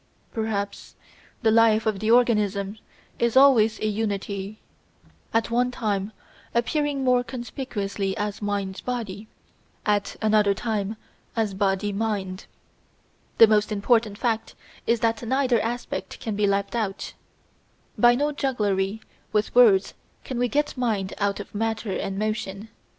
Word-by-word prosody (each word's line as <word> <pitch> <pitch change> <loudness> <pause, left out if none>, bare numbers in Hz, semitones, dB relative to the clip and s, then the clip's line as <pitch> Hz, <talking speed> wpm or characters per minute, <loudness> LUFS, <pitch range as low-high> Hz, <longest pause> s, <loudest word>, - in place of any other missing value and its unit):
Perhaps 210 -3 -3 0.5
the 220 - +4
life 225 -1 +4
of 215 -3 0
the 215 - -1
organism 210 -4 +2 0.4
is 235 +1 +2
always 245 -6 +6
a - - 0
unity, 205 -1 -2 0.7
at 225 0 0
one 245 +1 +2
time 210 -4 -2 0.4
appearing 280 +3 0
more 250 -1 +3
conspicuously 220 -6 -4
as 210 -1 -3
Mind 200 -2 -2
body, 220 -4 -4 0.6
at 205 -1 0
another 210 -2 +3
time 215 -1 -2 0.4
as 220 -3 0
Body 195 +1 0
mind. 195 -3 -3 0.9
The 225 - +10
most 215 0 +2
important 210 0 +2
fact 230 -2 -1 0.3
is 235 -1 +2
that 225 -1 +1
neither 255 -1 +1
aspect 240 +2 -4
can 220 -3 -3
be 205 0 +2
left 200 0 0
out. 205 -4 -3 0.8
By 240 0 +5
no 290 +3 +1
jugglery 210 -7 -1 0.3
with 210 0 0
words 215 -6 +5 0.3
can 255 -2 -4
we 245 - +2
get 295 +4 0
Mind 220 -7 -1
out 200 -1 0
of 205 - -9
Matter 225 0 -2
and 195 +1 -3
Motion. 215 -1 -3
215 Hz, 135 wpm, -25 LUFS, 200-235 Hz, 0.9 s, The